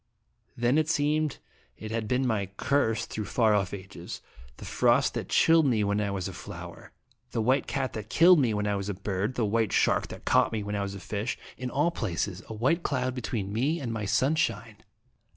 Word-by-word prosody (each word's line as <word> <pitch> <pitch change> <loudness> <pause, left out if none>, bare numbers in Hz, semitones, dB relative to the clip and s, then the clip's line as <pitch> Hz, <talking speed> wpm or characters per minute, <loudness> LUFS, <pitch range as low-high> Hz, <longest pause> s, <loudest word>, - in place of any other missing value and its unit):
Then 120 +5 +3
it 155 0 0
seemed 150 0 +1 0.4
it 110 0 -7
had 110 -1 -2
been 125 +4 +1
my 110 -5 0
curse 115 -6 +1
through 110 -1 -5
far 110 +1 +2
off 100 -2 +1
ages, 95 -3 -8 0.4
the - - -10
frost - - +2
that - - -4
chilled 165 -2 +5
me 110 -5 +2
when 100 +1 +1
I 100 - -1
was 95 -2 -3
a 95 - -7
flower, - - -9 0.4
the - - -3
white 130 +5 +2
cat 130 - -2
that 110 0 -6
killed 170 +4 +6
me 125 -5 +2
when 105 -1 -1
I 105 0 0
was 100 0 -3
a 100 - -2
bird, 100 +4 -2
the 115 - +1
white 110 0 +1
shark - - +2
that - - -10
caught - - +3
me 110 -2 -2
when 105 0 -3
I 100 - -1
was 100 0 -4
a - - -7
fish 105 +5 -3 0.2
in 125 0 -5
all 150 +7 +1
places 95 - -3
a - - -5
white 135 +10 +1
cloud 130 -5 -1
between 110 -5 -3
me 140 +9 0
and 120 -4 -4
my 105 -2 -3
sunshine. 115 -1 0
110 Hz, 215 wpm, -28 LUFS, 100-130 Hz, 0.4 s, killed